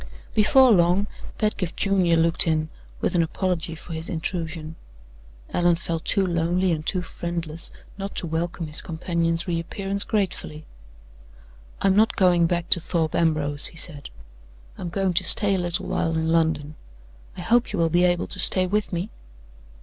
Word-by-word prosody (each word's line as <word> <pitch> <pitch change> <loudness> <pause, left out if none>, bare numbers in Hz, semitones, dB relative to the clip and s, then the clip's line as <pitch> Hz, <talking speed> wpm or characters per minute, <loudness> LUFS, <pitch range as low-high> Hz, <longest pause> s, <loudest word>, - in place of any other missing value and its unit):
Before 255 +4 +5
long, 180 +1 +3 0.3
Pedgift 205 -5 -2
Junior 185 -4 +2
looked 165 +1 +3
in, 155 -1 0 0.3
with - - 0
an 175 - +3
apology 165 -1 -2
for 165 +1 -10
his 160 +1 -5
intrusion. 160 -1 -4 0.8
Allan 175 -1 +3
felt 165 -1 -4
too 195 -3 +2
lonely 175 +1 0
and 155 -2 -2
too 180 +3 -1
friendless 170 -1 -5 0.3
not 195 +1 -5
to - - -2
welcome 165 +1 -3
his 150 0 -3
companion's 165 0 -1
re 170 -2 -1
appearance 195 +3 -2
gratefully. 185 -7 -3 1.2
"I'm 195 -1 +3
not 220 +2 +3
going 175 -3 +4
back 175 0 -2
to 175 - +6
Thorpe 160 -2 -1
Ambrose," 150 -3 +1
he 165 - -12
said; 150 -4 -5 0.7
"I'm 175 - -6
going 190 +1 0
to 185 +2 +2
stay 200 +1 +6
a 190 - +1
little 175 -1 -1
while 165 - -1
in 160 0 -1
London. 160 -2 +1 0.6
I - - -5
hope 240 +1 +2
you 210 - -3
will 165 -1 +2
be 175 +2 +2
able 175 0 +1
to - - -7
stay 185 -1 +3
with 210 +3 -1
me?" 180 +4 -3
170 Hz, 165 wpm, -24 LUFS, 165-185 Hz, 1.2 s, to